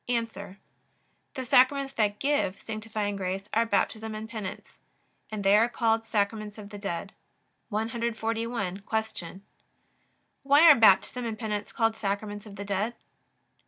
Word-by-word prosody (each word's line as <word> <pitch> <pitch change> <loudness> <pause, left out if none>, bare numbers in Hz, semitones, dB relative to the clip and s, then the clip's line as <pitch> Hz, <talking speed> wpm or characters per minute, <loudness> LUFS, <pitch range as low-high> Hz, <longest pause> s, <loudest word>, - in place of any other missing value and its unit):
A. 245 -1 +2 1.2
The 260 -2 -4
Sacraments 270 +3 +4
that 210 -4 +1
give 275 -9 0
sanctifying 215 -2 -4
grace 190 +1 -3
are 230 +1 +3
Baptism 220 -1 0
and 215 +1 -6
Penance; 215 -5 -7 0.5
and 215 -2 -4
they 195 +1 +5
are 225 +3 +4
called 225 -1 +1
Sacraments 215 -1 -1
of 205 -1 -10
the 205 - -8
dead. 195 -1 -4 0.6
141. 225 -2 -2 0.3
Q. 185 -1 -8 1.0
Why 285 +3 +5
are 320 - +11
Baptism 225 +2 +4
and 225 -2 -3
Penance 210 -3 -3
called 225 -1 +1
Sacraments 205 0 -3
of 200 - -10
the 200 0 -6
dead? 205 +4 -1
215 Hz, 135 wpm, -28 LUFS, 205-230 Hz, 1.2 s, are